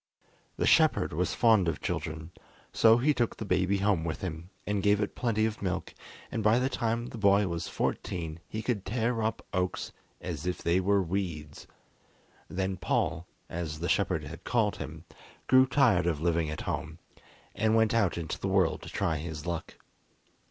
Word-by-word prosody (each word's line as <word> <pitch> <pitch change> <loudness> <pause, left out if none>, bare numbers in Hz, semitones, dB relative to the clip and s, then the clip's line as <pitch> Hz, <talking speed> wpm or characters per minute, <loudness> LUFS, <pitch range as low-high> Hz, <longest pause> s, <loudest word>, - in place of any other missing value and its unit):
The - - +1
shepherd - - +4
was 90 +4 -1
fond 110 -6 +4
of 80 -3 -1
children, 80 +2 -4 0.4
so 115 0 +6
he 145 +5 +3
took 120 -4 -1
the 110 - -5
baby 95 +1 +2
home 100 -4 +1
with 80 -1 -3
him 85 -1 -5 0.2
and 105 -1 0
gave 105 +1 +3
it 105 - -1
plenty 110 -3 +1
of 110 -1 -3
milk, 95 -2 -3 0.4
and 115 - -2
by 110 +2 +4
the 130 +1 +1
time 115 -2 -1
the 115 - -8
boy 100 0 +4
was 85 -2 -3
fourteen 80 -2 -3
he 110 +1 -5
could 115 -5 -1
tear 115 +3 -1
up 110 0 -2
oaks 90 -1 -1 0.3
as 85 -2 -5
if 90 - -3
they 85 +2 +3
were 100 +1 +2
weeds. 85 -5 -4 0.8
Then 95 0 -2
Paul, 85 -2 -1 0.2
as 80 -2 -4
the 85 - -2
shepherd 80 - +1
had 75 +3 -9
called 115 -4 +1
him, 80 +2 -7 0.4
grew 130 0 +6
tired 125 -10 +3
of 80 -4 0
living 85 -1 +1
at 75 - -4
home, - - -4 0.6
and 110 0 +2
went 110 0 +3
out 105 -7 +2
into 80 -2 -4
the - - -2
world 95 -3 +2
to - - -9
try 80 -1 0
his 75 -1 -6
luck. 85 -2 -4
95 Hz, 180 wpm, -29 LUFS, 85-110 Hz, 0.8 s, so